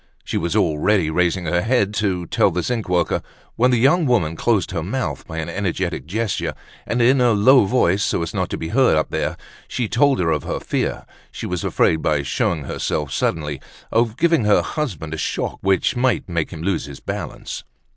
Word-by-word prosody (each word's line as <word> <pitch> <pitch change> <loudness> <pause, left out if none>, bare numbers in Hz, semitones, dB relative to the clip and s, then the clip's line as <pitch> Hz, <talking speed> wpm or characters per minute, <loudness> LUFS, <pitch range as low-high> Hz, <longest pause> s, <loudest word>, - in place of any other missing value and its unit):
She - - -5
was 85 0 -1
already 80 +2 +2
raising 90 +2 +1
her 85 +2 +1
head 110 -2 +1
to 90 -4 -1
tell - - +2
the 90 +1 -2
zinc 115 -6 -2
worker, 90 -1 +1 0.3
when 125 +2 +3
the 125 - +3
young 145 +7 +3
woman 95 -11 +1
closed 105 -1 +1
her 85 -3 -2
mouth 125 +10 -3
by 80 - -7
an 80 - -3
energetic 90 -2 -2
gesture, 110 +3 -2 0.3
and, 120 +1 +1
in 130 +2 +4
a 120 -2 +4
low 110 +3 +6
voice, 100 -4 +2
so 85 - 0
as 85 - -5
not - - -1
to - - -3
be 80 - -5
heard 125 -7 +4
up 80 - -1
there, - - -2 0.3
she 120 - -2
told 135 +5 +3
her 80 -2 +1
of 75 - 0
her - - -3
fear: - - -2 0.3
she - - -6
was 90 -2 -3
afraid, 80 - +2
by 75 -4 +1
showing 75 +2 -1
herself 75 +1 -2
suddenly, 75 -4 -1 0.3
of 115 0 +1
giving 165 -8 +3
her 105 - +4
husband 90 - -4
a - - -3
shock 75 - -3
which 95 +5 +2
might 125 -1 +1
make 85 -3 -1
him 80 - -8
lose 95 -2 -1
his 70 -2 -9
balance. - - -6
95 Hz, 205 wpm, -21 LUFS, 80-120 Hz, 0.3 s, low